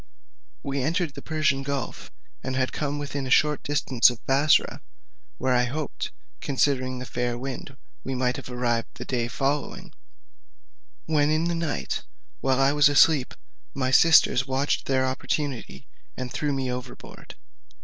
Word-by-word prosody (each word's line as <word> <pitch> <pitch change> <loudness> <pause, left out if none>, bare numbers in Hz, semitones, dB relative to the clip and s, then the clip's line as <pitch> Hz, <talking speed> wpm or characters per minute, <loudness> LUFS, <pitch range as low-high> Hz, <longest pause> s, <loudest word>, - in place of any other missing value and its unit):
We 140 0 -2
entered 160 +2 -1
the - - -9
Persian 155 -4 0
gulf, 135 -2 -4 0.3
and 130 - -3
had 130 0 0
come 145 -1 -2
within 140 -2 -4
a - - -5
short 150 +3 +3
distance 140 -5 +3
of 120 -2 -9
Bussorah 140 +3 +3 0.6
(where 130 0 +1
I 125 0 +3
hoped, 145 +3 -4 0.3
considering 130 -2 0
the 125 - -6
fair 120 -1 -2
wind, 130 +1 -7 0.3
we 135 - -3
might 125 0 0
have - - -8
arrived 120 -2 -1
the - - -7
day 120 -3 -1
following), 140 +4 -2 1.1
when 150 -2 +2
in 155 +1 +1
the 170 0 0
night, 160 - -2 0.4
while 135 -1 +1
I 135 +1 +4
was 145 -1 +5
asleep, 145 -2 +4 0.4
my 130 -1 0
sisters 135 -3 +5
watched 135 +2 0
their 130 -1 +2
opportunity, 130 - -3 0.3
and 130 -1 -5
threw 150 -1 -1
me 135 -2 -2
overboard. 125 0 -9
135 Hz, 150 wpm, -25 LUFS, 125-145 Hz, 1.1 s, was